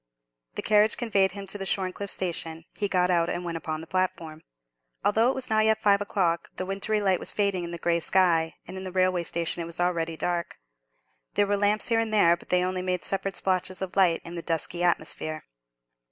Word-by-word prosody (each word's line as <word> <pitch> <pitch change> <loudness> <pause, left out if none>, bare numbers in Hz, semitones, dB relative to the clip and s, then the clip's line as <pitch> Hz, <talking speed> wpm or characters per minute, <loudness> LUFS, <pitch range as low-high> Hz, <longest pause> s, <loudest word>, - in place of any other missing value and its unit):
The - - -3
carriage 210 0 +3
conveyed 200 -6 +1
him 200 -1 -7
to 200 +2 -6
the 195 - -4
Shorncliffe 190 +1 -1
station. 165 -3 -3
He 205 - -1
got 180 -2 +2
out 170 -1 +2
and 175 +1 -3
went 170 -1 -3
upon 155 -1 -4
the - - -8
platform. 165 -3 -2 0.6
Although 225 +4 +4
it - - -1
was 265 -1 -3
not 215 -1 +3
yet 220 0 +3
five 205 -2 +3
o'clock, 185 -5 0
the 185 - -4
wintry 195 +3 -1
light 190 -3 +2
was - - -1
fading 200 -3 0
in 170 - -5
the 170 - -5
grey 170 0 +1
sky, 165 -2 +2
and 190 - -7
in 190 - -5
the 185 - -5
railway 185 -1 +2
station 170 0 -2
it 165 - -4
was 170 +1 -8
already 165 -2 0
dark. 175 0 -2 0.8
There 205 - +3
were 205 0 +1
lamps 205 +2 +2
here 230 -1 +3
and 225 -1 -1
there, 175 -6 +5
but 175 - -16
they 180 0 +3
only 185 0 -1
made 180 -2 -2
separate 195 0 -2
splotches 185 0 0
of 190 -1 -5
light 180 -4 +4
in 170 - -8
the 170 - -4
dusky 165 +1 -1
atmosphere. 155 -2 0
185 Hz, 220 wpm, -27 LUFS, 170-200 Hz, 0.8 s, there